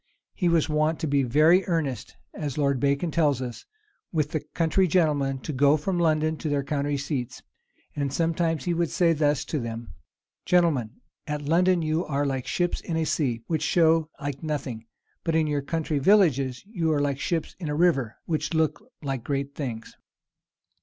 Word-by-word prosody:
"He 180 -4 +1
was 165 -2 +3
wont 155 +1 +1
to 160 - -1
be 140 -1 +2
very 155 +9 +4
earnest," 150 - -2 0.2
as 145 -3 -4
Lord 140 -3 +1
Bacon 140 +4 +1
tells 150 -5 +2
us, 125 -2 -6 0.5
"with 155 -3 0
the 155 - 0
country 170 +5 +1
gentlemen 150 -6 +2
to 155 - -5
go 140 +3 +4
from 175 +4 -2
London 155 -1 +2
to 155 - -3
their 145 -1 0
country 145 0 -1
seats. 135 -3 -4 0.5
And 140 -2 -1
sometimes 165 -1 0
he 175 - +1
would 170 -1 0
say 170 -2 +3
thus 150 -2 +1
to 155 - -2
them: 115 -1 -6 0.5
'Gentlemen, 155 -12 +1 0.3
at 150 -1 -3
London 175 +3 +3
you 155 +2 0
are 145 -2 -1
like 135 -2 -2
ships 175 -1 -1
in 165 - -3
a 160 - +1
sea, 125 -7 -1
which 160 -3 -1
show 160 -1 +3
like 145 -1 -4
nothing; 135 -7 -4 0.4
but 165 - 0
in 160 -1 +3
your 145 -1 0
country 155 0 -2
villages 140 -8 +3
you 175 -7 -1
are 150 - +2
like 140 -1 0
ships 165 0 -2
in 165 -5 -4
a 150 - -1
river, 145 -9 +2
which 160 0 -2
look 160 -1 +1 0.2
like 135 -4 -3
great 140 0 -2
things. 120 -6 -6
150 Hz, 180 wpm, -26 LUFS, 140-165 Hz, 0.5 s, very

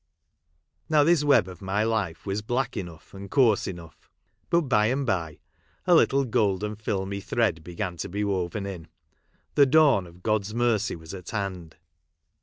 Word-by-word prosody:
Now 150 -1 +5
this 165 -1 +3
web 140 -10 +4
of 90 -2 -11
my 100 +2 0
life 105 -7 -2
was 100 +1 -2
black 120 +5 -2
enough 85 -4 -8
and 100 0 -9
coarse 120 -6 +3
enough; 85 -4 -10 0.4
but 170 - +3
by 110 -8 +2
and 135 +3 0
by, 85 - -2 0.5
a 180 - +4
little 140 -4 +4
golden 105 -3 0
filmy 100 -2 -3
thread 100 -8 0
began 90 +1 -5
to - - -5
be 100 +3 -2
woven 100 0 -2
in; 90 -5 -7 0.7
the 140 -1 +5
dawn 140 - +4
of 85 +1 -17
God's 110 -1 -1
mercy 115 -3 +1
was 80 0 -10
at 90 -3 -8
hand. 95 -6 -4
100 Hz, 165 wpm, -26 LUFS, 90-120 Hz, 0.7 s, Now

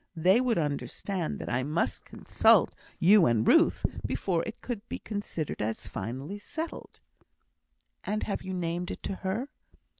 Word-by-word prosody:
They 185 +8 +4
would 250 -3 +1
understand 165 +4 -2
that - - -7
I 120 +2 0
must 150 +5 -1
consult - - +3 0.2
you 190 0 +6
and 115 -2 +2
Ruth, - - +5 0.2
before 175 -4 0
it 225 - -7
could 240 -5 -4
be - - -3
considered 205 - -4
as 110 +1 -2
finally 135 - -5
settled." 320 +10 -6 1.0
"And 215 +1 -2
have 205 - -2
you 190 0 -5
named 175 0 -2
it - - -6
to 195 - -3
her?" 215 +9 -2
180 Hz, 150 wpm, -29 LUFS, 155-205 Hz, 1.0 s, you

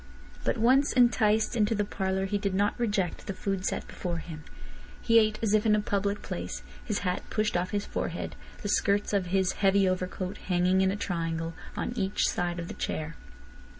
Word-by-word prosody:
But - - 0
once 260 +5 +4
enticed 225 -3 +3
into 220 -1 +2
the 205 0 0
parlour 190 -1 -1
he 205 +1 -1
did 200 -1 -1
not 205 +1 +2
reject 205 -6 -1
the 200 - -3
food 195 -1 -2
set - - -2
before 175 -2 -4
him. 160 -2 -8 0.6
He 230 -1 +5
ate 215 -1 +2
as 215 -2 +2
if 215 -1 +4
in 215 -2 +4
a - - +2
public 200 0 -1
place, 85 -7 -5 0.2
his 210 - -1
hat 180 0 0
pushed 215 -2 0
off 180 +1 0
his 205 0 -2
forehead, - - -3 0.3
the - - -2
skirts 205 0 +2
of 195 -3 +1
his 190 0 +2
heavy 195 -1 +3
overcoat 185 +1 -2
hanging 180 +1 +2
in 190 - +3
a 195 - 0
triangle 165 -4 -2 0.2
on - - -2
each 195 -3 +1
side 175 -1 -1
of 170 -1 -4
the - - -6
chair. 155 +1 -3
195 Hz, 195 wpm, -29 LUFS, 180-210 Hz, 0.6 s, He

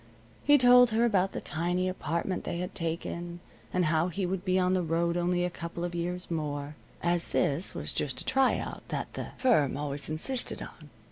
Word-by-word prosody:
He 290 0 +6
told 250 -1 +7
her 225 +1 +2
about 195 -4 +2
the - - -4
tiny 175 +3 -1
apartment 180 0 -2
they - - -3
had 180 +1 -4
taken, 170 +1 -4 0.3
and 180 -1 +1
how 160 +2 +2
he 185 +2 -2
would 185 0 -2
be 185 -1 +1
on 185 0 +2
the 185 - +2
road 170 +1 0
only 175 0 +1
a 180 - -2
couple 170 0 -6
of 175 0 -3
years 175 +1 -3
more, 150 -2 -3 0.3
as 170 0 +1
this 150 +7 0
was - - +1
just - - -1
a - - -7
try 270 -1 +3
out - - -6
that - - -4
the - - -5
firm 150 - +3
always 145 0 -4
insisted 240 +12 0
on. - - -10
175 Hz, 200 wpm, -29 LUFS, 165-185 Hz, 0.3 s, told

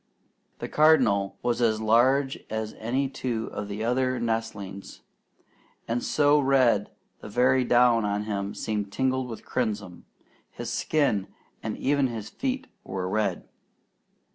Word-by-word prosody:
The - - -5
Cardinal 125 -11 +3
was 120 0 0
as 110 -2 +2
large 130 +5 +3
as 110 0 -3
any 130 +5 0
two 120 -4 -3
of 100 - -4
the 105 +2 -4
other 130 +1 +1
nestlings, 115 -4 -4 0.9
and 120 +1 -1
so 145 0 +3
red 130 -7 +3 0.3
the - - -9
very 125 +4 +3
down 120 -1 +4
on 105 0 -1
him 100 -1 -3
seemed 105 -2 -3
tinged 130 +1 0
with 115 - -8
crimson; 105 -7 -3 0.4
his - - -6
skin 135 -11 +1 0.3
and 110 -1 -4
even 140 0 +2
his 110 -3 -6
feet 265 0 -3 0.2
were 95 -1 -4
red. 105 +2 -1
115 Hz, 135 wpm, -26 LUFS, 105-130 Hz, 0.9 s, down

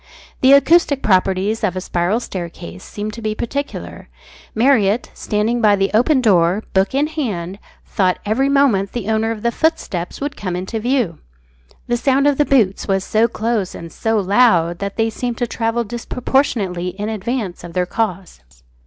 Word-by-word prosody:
The 265 +1 +6
acoustic 285 -1 +4
properties 195 +2 +1
of 185 -4 0
a - - -1
spiral 180 +4 0
staircase 170 - -7
seem 210 +1 -5
to 230 - -9
be 215 -1 -2
peculiar. 280 +6 -5 0.5
Marriott, 225 -2 +2
standing 220 +3 -1
by 210 -2 +5
the 195 0 0
open 255 +5 +3
door, 190 -2 +3
book 195 +6 +1
in 285 +2 +3
hand, 205 - -4 0.3
thought 185 -2 +1
every 250 +7 +1
moment 255 -9 +2
the 225 -4 -4
owner 220 0 +1
of 225 -2 -5
the 235 - +2
footsteps 235 - -2
would 285 0 -4
come 185 -3 -4
into 190 +5 -4
view. 235 - 0 0.7
The 240 - 0
sound 270 +3 +2
of 290 -1 +2
the 295 - +4
boots 220 -10 +2
was 195 -1 +1
so 220 +3 +2
close 220 -4 -2
and 165 -1 -9
so 225 0 0
loud 190 -5 +3
that 200 0 -4
they 225 0 +1
seemed 240 +1 -4
to 245 - 0
travel 230 0 -1
disproportionately 230 -5 -1
in 210 - -2
advance 215 -3 -3
of 175 -1 -9
their 180 0 0
cause. 190 - -3
220 Hz, 170 wpm, -19 LUFS, 190-245 Hz, 0.7 s, The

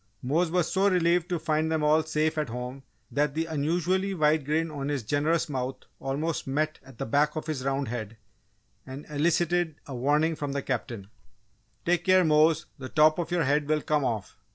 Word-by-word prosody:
Mose 160 +7 +1
was 175 -1 0
so 195 +1 +3
relieved 175 -1 +2
to 175 - 0
find 155 0 0
them 160 -1 0
all 155 +1 +4
safe 155 0 0
at 150 -5 -2
home 125 +3 -6 0.3
that 145 +2 0
the 160 +1 0
unusually 175 +5 0
wide 155 -2 +2
grin 160 +2 0
on 140 -1 -4
his 140 -4 -2
generous 155 +8 +1
mouth 130 -2 -4 0.2
almost 145 +4 -2
met 155 +3 -1
at 130 -2 -15
the - - -3
back 145 +5 +2
of 155 - -4
his 155 -5 -3
round 135 0 -1
head 115 -2 -5 0.7
and 135 +2 -9
elicited 170 +2 +1
a 140 - -8
warning 150 +6 +1
from 145 -2 -4
the 140 -1 -2
Captain: 115 -5 -4 0.8
"Take 175 0 +2
care, 185 -1 +5
Mose, 155 0 +4
the 130 -1 -6
top 155 +2 +4
of 170 - -2
your 175 -2 +1
head 145 +1 +1
will 155 -1 +1
come 150 -2 +1
off!" 110 -6 -3
150 Hz, 195 wpm, -27 LUFS, 135-165 Hz, 0.8 s, care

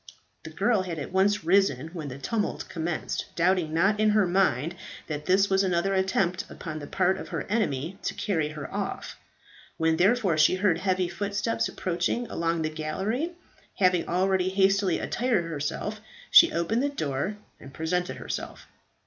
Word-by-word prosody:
The - - -9
girl 225 -5 +1
had 175 -3 -5
at 145 - -5
once 200 +2 +2
risen 165 -5 +2
when 165 -4 -6
the 130 -1 -7
tumult 210 - -2
commenced, 165 -1 -3
doubting 175 -2 +2
not 195 +6 +2
in 215 0 +4
her 210 -1 +4
mind 175 -5 +1 0.3
that 150 -1 -5
this 195 +2 +4
was 195 0 +2
another 185 +1 +1
attempt 190 -1 +1
upon 155 -3 -6
the 145 - -8
part 190 +2 +1
of - - -7
her - - -3
enemy 190 - -2
to - - -3
carry 160 -8 -1
her 150 -1 -7
off. - - -4 0.6
When, 160 0 +2
therefore, 190 -3 +3
she 155 +4 +5
heard 185 -3 +2
heavy 185 -1 +1
footsteps 205 +5 -1
approaching 180 +7 -1
along 165 -1 -1
the 155 - 0
gallery 195 - -2 0.4
having 180 -3 +2
already 185 +1 +1
hastily 195 -1 +2
attired 235 -7 0
herself 165 +7 -4 0.3
she 340 - +8
opened 210 +8 0
the 285 - +1
door 160 - -3 0.2
and 135 - -12
presented 180 +4 -2
herself. - - -6
185 Hz, 165 wpm, -27 LUFS, 160-200 Hz, 0.6 s, she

